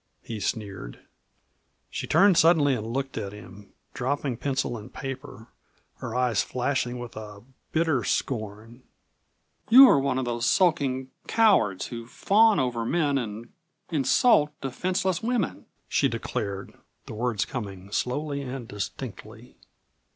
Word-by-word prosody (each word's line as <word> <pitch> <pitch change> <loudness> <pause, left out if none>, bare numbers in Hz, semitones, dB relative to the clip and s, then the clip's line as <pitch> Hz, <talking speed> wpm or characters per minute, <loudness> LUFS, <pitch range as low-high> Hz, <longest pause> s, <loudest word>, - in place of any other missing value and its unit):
he 110 -2 -6
sneered. 100 - -4 0.9
She - - -4
turned 195 -2 +5
suddenly 160 -4 +5
and 110 -3 -3
looked 135 +1 -3
at 100 -2 -5
him, 100 -1 -13 0.2
dropping 135 0 -1
pencil 135 -1 -1
and 110 +2 -9
paper, 135 -4 -7 0.5
her 115 - -6
eyes 125 -4 +2
flashing 125 -1 -1
with 120 -1 -8
a 105 -2 -9 0.3
hitter 160 -7 +1
scorn. 110 +1 -3 0.9
"You 260 +4 +10
are 145 - +5
one 135 -1 0
of 130 - -1
those 120 0 -1
sulking 135 -8 +2 0.2
cowards 115 - +3
who 115 -1 -7
fawn 215 - +4
over 125 -3 -1
men 145 +1 +1
and 115 0 -6 0.4
insult 150 - +3
defenseless 180 +6 -1
women!" 230 -5 -2 0.2
she - - +2
declared, 100 -1 -4 0.3
the - - -8
words 115 -1 -1
coming 100 -5 -7
slowly 140 +5 -2
and 130 -3 -6
distinctly. 110 +2 -7
125 Hz, 130 wpm, -26 LUFS, 110-145 Hz, 0.9 s, You